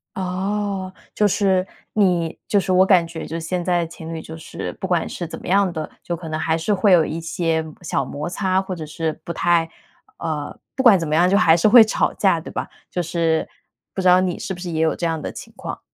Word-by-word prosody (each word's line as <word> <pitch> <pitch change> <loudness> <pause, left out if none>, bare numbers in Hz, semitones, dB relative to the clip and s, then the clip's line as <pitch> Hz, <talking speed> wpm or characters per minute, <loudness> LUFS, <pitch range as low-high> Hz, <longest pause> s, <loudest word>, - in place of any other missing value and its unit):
哦， 190 +1 -2 0.2
就 210 - +3
是 190 -2 +2 0.3
你 180 -6 +1
就 205 - +3
是 185 -1 -2
我 185 +1 +5
感 180 -4 +4
觉 165 -1 -7
就 165 +2 -4
现 175 +2 -3
在 175 -1 +1
情 165 0 -8
侣 160 - -5
就 160 - -9
是 160 - -6
不 - - -6
管 175 -3 +1
是 175 - -5
怎 165 - -7
么 - - -10
样 195 0 +3
的， 155 -2 -5
就 170 - -3
可 165 0 -9
能 155 0 -2
还 160 0 +1
是 165 +6 0
会 200 +1 +3
有 170 -3 +6
一 160 - -4
些 165 -1 -1 0.2
小 165 - -1
摩 145 +4 -5
擦， 185 +1 0
或 190 -1 -5
者 160 -3 -6
是 155 +1 -4
不 - - -5
太 170 0 +2 0.5
呃， 155 -3 -4 0.2
不 265 - -1
管 220 -7 +7
怎 165 - -3
么 150 - 0
样， 175 +3 +4
就 200 - +4
还 165 -6 +5
是 170 +5 +3
会 230 +2 +9
吵 220 - 0
架 190 -5 +2
对 - - -9
吧？ - - -4 0.2
就 180 - -1
是 165 -1 0 0.5
不 190 - -2
知 185 - +2
道 180 +1 +7
你 185 -1 -1
是 190 - -4
不 180 - -9
是 180 -1 -5
也 160 -1 -1
有 160 -1 +3
这 170 - -1
样 160 -1 -2
的 - - -4
情 - - -11
况？ - - -6
175 Hz, 265 characters per minute, -21 LUFS, 165-190 Hz, 0.5 s, 会